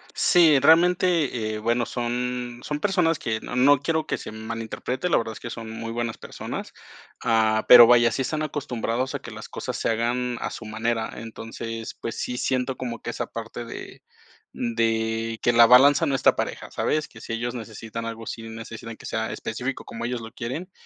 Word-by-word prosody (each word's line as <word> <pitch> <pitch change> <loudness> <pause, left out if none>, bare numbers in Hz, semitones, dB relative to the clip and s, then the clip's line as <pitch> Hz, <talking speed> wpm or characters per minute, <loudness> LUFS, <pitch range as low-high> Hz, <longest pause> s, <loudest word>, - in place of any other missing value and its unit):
Sí. 165 -5 +5
Realmente, 160 -6 +3
eh, - - -4
bueno, 120 +2 +1
son 120 0 -3
son 150 0 -3
personas 175 -4 +2
que 110 -1 -2
No 125 - -6
no 135 +2 +5
quiero, 160 +2 0
que - - -1
se - - -8
malinterprete. 115 +7 -4
La 170 - +4
verdad, 115 -1 -2
es - - -10
que 115 - -7
son 115 -1 -7
muy 115 0 -5
buenas 115 -1 -3
personas, - - -7 0.5
ah, 110 -1 +2
pero, 120 -1 +11
vaya, 120 -1 +6
sí - - -1
están 155 +4 -2
acostumbrados, 130 -4 -2
a - - -2
que - - -10
las - - -9
cosas - - -5
se - - -1
hagan, 120 +2 0
a - - -2
su 115 - -8
manera. 110 +1 -2
Entonces, 115 0 -7
pues 115 - -4
sí 125 - -3
siento, 130 0 0
como 120 -3 -5
que - - -4
esa 120 - -4
parte 115 +1 -7
de 115 - -9 0.5
de 115 -1 -1
que 120 - +3
la 115 0 +8
balanza 140 +6 +7
no 140 - +1
está - - +4
pareja, - - -4
¿sabes? 155 0 0
Que 110 - -14
si - - -5
ellos 120 +1 -2
necesitan 115 -1 -6
algo, 115 0 -6
sí 115 - -6
necesitan 115 0 -8
que - - -13
sea 110 0 -2
específico, 125 +4 -4
como 115 - -6
ellos 125 -1 -2
lo 115 0 -9
quieren, 145 +11 -5
120 Hz, 195 wpm, -25 LUFS, 115-130 Hz, 0.5 s, pero